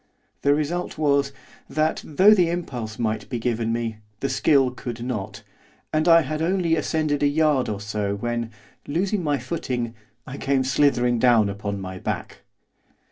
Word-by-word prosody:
The 145 0 +4
result 165 +4 -2
was, 140 -2 +2 0.4
that, 155 +1 0
though 190 +8 +5
the 180 -5 +3
impulse 125 -11 -4
might 110 -2 -2
be 125 - -2
given 115 -1 -1
me, 115 -1 -2 0.2
the 135 - -1
skill 135 0 +3
could 120 -2 -6
not, 110 -4 -5 0.5
and 155 +2 +1
I 165 -1 +7
had 155 +3 -3
only 170 -1 +1
ascended 155 -1 0
a 145 - +4
yard 145 -4 +2
or 105 -2 -3
so 105 -1 -2
when, 120 +2 -3 0.4
losing 185 +5 0
my 145 -2 +1
footing, 125 -4 -3 0.3
I 130 - -7
came 135 -1 +1
slithering 125 -3 +2
down 115 -4 +4
upon 100 0 -4
my 95 -1 -6
back. - - -4
130 Hz, 160 wpm, -24 LUFS, 115-155 Hz, 0.5 s, I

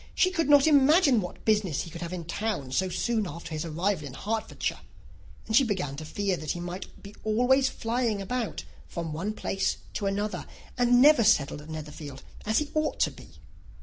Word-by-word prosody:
She 370 - +3
could 330 -6 0
not 285 -1 +7
imagine 290 - +5
what 180 - -8
business 210 -9 +1
he 170 - -10
could 170 - -8
have 170 0 -4
in 175 -2 -5
town 170 -7 -3
so 185 +7 +1
soon 215 +3 0
after 170 +1 -8
his 155 0 -3
arrival 165 0 -1
in 130 - -9
Hertfordshire; 220 +6 -3 0.7
and 220 - -1
she 270 - +7
began 180 - -2
to 155 - -6
fear 195 +4 -1
that 155 - -3
he 175 - -6
might 175 +2 -5 0.4
always 250 +5 +3
be - - -13
flying 230 -2 0
about 230 +3 -3 0.2
from 165 -3 -5
one 190 +7 -3
place 195 -2 -1 0.2
to 200 - -2
another, 205 +2 -2 0.3
and 245 0 +5
never 295 -5 +7
settled 150 -9 +3
at 150 - -13
Netherfield 150 -3 -8 0.2
as 220 - +2
he 300 -1 -1
ought 310 0 0
to - - +3
be. - - -14
205 Hz, 195 wpm, -28 LUFS, 165-245 Hz, 0.7 s, not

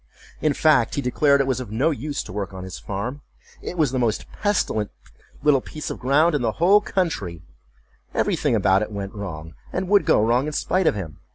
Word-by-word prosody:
In 155 -2 +2
fact, 150 -7 +3
he 140 - 0
declared 140 +3 +3
it - - +1
was 130 -2 0
of 125 -4 -6
no 130 +10 +1
use 145 +1 -3
to - - -10
work 95 -2 -4
on 95 - -7
his 95 -1 -7
farm; 115 +9 -4 0.4
it 180 - -6
was 150 -6 +2
the 130 - -1
most 115 -3 0
pestilent 190 - 0 0.5
little 145 -3 +4
piece 150 +3 -6
of - - -6
ground 150 +6 +3
in 145 - +1
the 115 -2 0
whole 195 +5 +5
country; 155 - -2 0.7
every - - +1
thing - - +1
about 95 +1 +3
it 105 - -3
went 100 -1 -5
wrong, 80 -6 -7 0.2
and 185 +1 -2
would 205 0 +4
go - - +5
wrong, 120 +5 +2
in 150 - -4
spite 185 +3 +1
of - - +3
him. 85 -7 -6
130 Hz, 215 wpm, -23 LUFS, 100-155 Hz, 0.7 s, whole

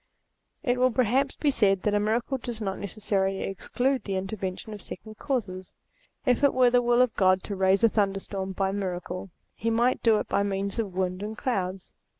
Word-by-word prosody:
It 250 -4 +1
will 255 0 +5
perhaps 255 +3 +1
be 295 - +1
said 195 -6 +2
that 210 - +1
a 205 - +3
miracle 230 +5 0
does 235 -2 -5
not 195 -3 -3
necessarily 195 -1 -1
exclude 250 +7 -1
the 195 - -3
intervention 190 +2 -4
of 205 - -8
second 215 +5 -9
causes. 200 -10 -3 0.5
If 250 +1 +2
it 280 - +4
were 250 -1 +5
the 245 0 +4
will 240 +1 +4
of 250 - -1
God 185 -1 +3
to 200 - -4
raise 190 +2 +3
a - - +8
thunderstorm 195 -2 -1
by 190 0 0
miracle, 185 -1 -4 0.2
he 230 - -2
might 240 +3 +2
do 225 -2 +4
it - - -3
by - - +1
means 200 +1 -1
of 200 -5 -3
winds 185 0 -1
and 215 +1 -5
clouds. 190 -8 -2
205 Hz, 195 wpm, -27 LUFS, 190-240 Hz, 0.5 s, a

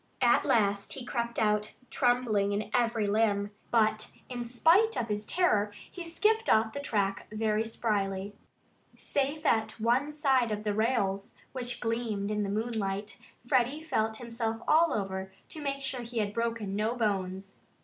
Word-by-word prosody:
At 240 - +4
last 200 -2 +2
he 260 -3 -6
crept 235 -1 -2
out, 210 -1 +1 0.2
trembling 240 -6 +2
in 210 +1 -3
every 230 -3 +2
limb. 205 -1 +1 0.2
But 215 -2 +2 0.2
in 245 -1 -4
spite 330 - +3
of 230 - -2
his 210 0 -2
terror 215 - +2 0.2
he 360 - -6
skipped 435 +7 +1
off 220 0 +4
the - - -4
track 200 -8 -1
very 215 0 +1
spryly. 205 -3 -2 0.6
Safe 285 +3 -2
at 220 -3 +2
one 245 +6 +2
side 265 -6 +2
of 210 0 -2
the 210 -1 0
rails, 205 -3 0 0.2
which 245 -2 -3
gleamed 225 -3 -2
in 210 0 0
the 200 - -1
moonlight, 210 -2 -2 0.3
Freddie 260 +5 +1
felt 220 -8 0
himself 230 -1 -3
all 330 +1 +5
over, 190 -1 -3 0.2
to 310 - -7
make 275 -1 -2
sure 265 -1 -1
that 235 -1 -7
he 240 - -6
had 205 -2 0
broken 230 -3 -2
no 215 +3 0
bones. 195 -4 -2
225 Hz, 160 wpm, -30 LUFS, 205-245 Hz, 0.6 s, all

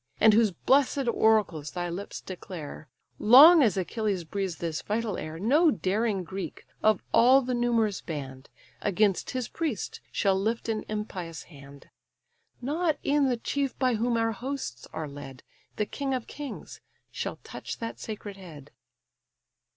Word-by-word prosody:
And 220 -1 +6
whose 220 0 +5
bless'd 270 - +2
oracles 215 -10 +2
thy 175 -1 -3
lips 180 +4 -6
declare; 170 -5 -8 0.3
Long 295 +9 +9
as 215 -8 +3
Achilles 195 -1 -1
breathes 190 +1 -3
this 165 -3 -3
vital 215 -1 -2
air, 155 +1 -6
No 285 - +4
daring 205 -3 0
Greek, 190 +2 -7 0.2
of 215 0 +3
all 260 +3 +6
the 250 +1 -2
numerous 235 -4 +1
band, 135 -4 -7 0.3
Against 205 -1 +1
his 255 -2 -3
priest 305 - -4
shall 195 -2 +2
lift 220 +5 -1
an 220 -1 -2
impious 185 -6 -5
hand; 140 -3 -15 0.7
Not 310 +4 0
e'en 285 -1 +3
the 245 - 0
chief 275 +3 -2
by 255 -2 +2
whom 230 +1 +1
our 225 0 +1
hosts 245 - -5
are 160 -1 -4
led, 140 -2 -10 0.3
The 210 - 0
king 270 +4 -2
of 250 - -4
kings, 290 -2 -8 0.3
shall - - -4
touch - - -7
that 230 0 -6
sacred 205 -2 -7
head." 160 -7 -12
215 Hz, 150 wpm, -28 LUFS, 175-245 Hz, 0.7 s, Long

